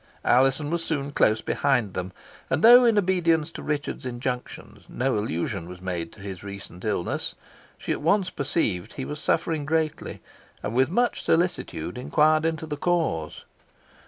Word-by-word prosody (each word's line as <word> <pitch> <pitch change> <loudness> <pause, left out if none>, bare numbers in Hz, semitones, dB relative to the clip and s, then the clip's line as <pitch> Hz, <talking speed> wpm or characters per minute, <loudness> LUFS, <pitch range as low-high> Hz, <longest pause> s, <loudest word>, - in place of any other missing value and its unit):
Alizon 135 +4 +3
was 170 -1 -1
soon 145 -3 -2
close 110 -5 +3
behind 125 -9 +1
them, 90 +1 -4 0.4
and 130 - 0
though, 245 +2 +9
in 230 -3 +4
obedience 175 -5 +2
to - - -8
Richard's 145 -1 -3
injunctions, 125 0 -5
no 130 +1 0
allusion 95 -2 -2
was 90 0 -9
made 90 -3 -4
to 100 - -15
his 95 -2 -7
recent 100 -2 -9
illness, 105 -5 -2 0.4
she - - -4
at - - -1
once 180 +4 +2
perceived 130 - -1
he 135 - -5
was 150 0 -6
suffering 160 0 0
greatly, 155 0 -1 0.4
and 105 - -3
with 130 +3 +3
much 240 +7 +1
solicitude 165 - -1
inquired 155 +4 +3
into 160 -1 -1
the 150 -2 -5
cause. 160 - -1
140 Hz, 160 wpm, -25 LUFS, 100-160 Hz, 0.4 s, though